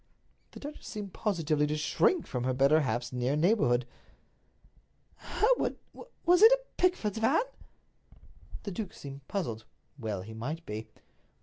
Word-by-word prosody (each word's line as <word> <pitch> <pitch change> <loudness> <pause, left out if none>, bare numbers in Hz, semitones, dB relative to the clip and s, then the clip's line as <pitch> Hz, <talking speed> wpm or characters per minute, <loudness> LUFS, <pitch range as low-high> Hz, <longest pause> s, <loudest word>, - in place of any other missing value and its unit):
The - - -9
duchess 295 +1 -8
seemed 205 -4 -6
positively 160 -8 0
to 150 +1 -1
shrink 230 - +2
from 125 -2 -3
her 130 0 0
better 140 +4 +5
half's 120 -1 -2
near 125 +3 0
neighborhood. 150 - +3 1.3
"Hereward, 485 +3 +1 0.5
was 355 +2 +5
it 445 +2 +10
a - - +3 0.2
Pickford's 230 - +1
van?" 260 - +3 1.2
The 200 - -4
duke 195 +1 -5
seemed 140 -1 -10
puzzled. 120 - -3 0.4
Well 105 -6 -3
he 110 +3 -9
might 150 +9 -5
be. 110 +1 -5
155 Hz, 135 wpm, -30 LUFS, -, 1.3 s, it